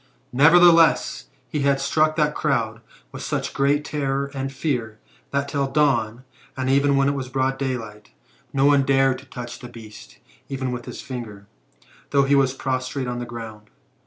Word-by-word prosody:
Nevertheless, 165 +4 +5 0.2
he 150 +5 -3
had 140 -1 +2
struck 155 +3 +2
that 150 -1 +1
crowd 115 -8 -1 0.3
with - - -8
such - - -3
great 145 +2 +1
terror 140 -2 -2
and 135 0 -4
fear, 125 -6 -3 0.3
that 140 0 -1
till 140 -1 -1
the 135 - -12
dawn, 125 -5 +1 0.3
and 130 0 0
even 140 +1 +3
when 135 0 +3
it - - +3
was 135 -2 -5
broad 135 0 -1
day, 130 -2 -1 0.7
no 135 +1 +2
one 145 -1 +5
dared 135 -1 +2
to 130 - -15
touch 120 -3 -8
the 125 - -9
beast, 110 -2 -13 0.3
even 130 -2 -3
with 120 -1 -5
his - - -7
finger, 110 -6 -7 0.6
though 140 -1 +3
he 135 +1 +1
was 135 -2 +3
prostrate 130 0 -3
on 120 0 -3
the 120 - -5
ground. 110 -2 -9
135 Hz, 175 wpm, -23 LUFS, 125-140 Hz, 0.7 s, Nevertheless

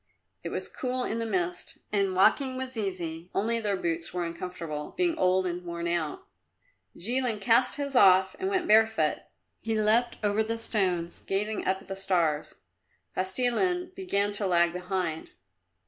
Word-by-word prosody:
It - - -3
was - - -3
cool 255 0 -2
in 230 - -2
the 230 - -2
mist 175 -3 -2
and 195 -2 +1
walking 260 +7 +3
was 260 0 -4
easy, 180 -5 -4
only 230 +4 +1
their 205 -3 -1
boots 165 -1 -2
were 180 -1 -2
uncomfortable, 170 -3 -6
being 350 -2 +2
old 185 - +2
and 180 0 -3
worn 170 -1 -4
out. 170 -3 -2 0.7
Jilin 235 +3 0
cast 235 +4 +3
his 280 -2 -3
off 190 -4 +6
and 380 0 -1
went 375 -3 0
bare 220 +1 +7
foot. 160 -9 0 0.4
He 225 -1 -1
leapt 225 +3 +2
over 205 +1 +2
the 225 +1 -2
stones, 185 -7 -1
gazing 210 +3 -1
up 190 +1 0
at - - -20
the 195 - -4
stars. 175 -6 0 0.6
Kostilin 305 - 0
began 205 - 0
to 205 -1 -1
lag 170 -1 +3
behind. 180 -3 -3
195 Hz, 160 wpm, -28 LUFS, 175-230 Hz, 0.7 s, bare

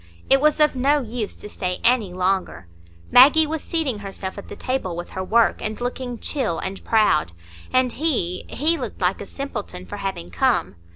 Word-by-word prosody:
It 270 0 +6
was 305 +1 +3
of 300 -2 +4
no 280 +3 +3
use 230 -3 -4
to - - -10
stay 180 -3 -3
any 235 -6 +3
longer. 185 - -1 0.5
Maggie 295 +6 +8
was 315 0 -3
seating 300 - -1
herself 195 -1 -6
at - - -11
the - - -7
table 255 -9 -3
with 175 +1 -7
her 185 - -4
work, 230 +4 +2
and 215 0 -4
looking 245 0 -4
chill 245 - -2
and 190 0 -5
proud; 210 - +2 0.4
and 255 -1 +3
he—he 290 - 0
looked 255 - -6
like 185 +1 0
a 200 - -7
simpleton 210 -9 -6
for 205 - -7
having 190 - -5
come. 85 - +1
225 Hz, 180 wpm, -22 LUFS, 190-270 Hz, 0.5 s, Maggie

